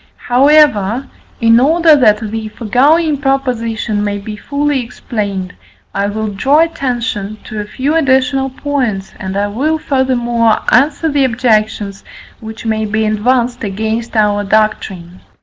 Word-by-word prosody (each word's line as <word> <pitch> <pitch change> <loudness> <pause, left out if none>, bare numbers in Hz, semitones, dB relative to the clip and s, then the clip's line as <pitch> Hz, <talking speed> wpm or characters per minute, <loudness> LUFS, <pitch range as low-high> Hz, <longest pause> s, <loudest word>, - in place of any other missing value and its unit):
However, 260 -4 +3 0.3
in 230 0 +5
order 320 +4 +4
that 215 -5 +2
the 220 -1 -4
foregoing 280 +9 +2
proposition 235 -6 -1
may 205 -1 -2
be 210 +1 -7
fully 285 +5 -1
explained, 200 -6 -5 0.4
I 200 0 -1
will 215 +1 -3
draw 270 +10 +2
attention 240 -10 -2
to 215 - -7
a 210 - -4
few 265 +7 -2
additional 270 -3 +2
points, 255 -8 -3
and 190 +1 -4
I 200 - +1
will 275 +10 -1
furthermore 240 -6 +1
answer 285 +6 +3
the 285 -3 +2
objections 215 -5 0 0.4
which 220 +1 -9
may 220 -1 -1
be 215 +1 -1
advanced 240 +3 0
against 220 +4 -3
our 205 -1 +2
doctrine. 195 -4 -1
230 Hz, 130 wpm, -14 LUFS, 210-270 Hz, 0.4 s, in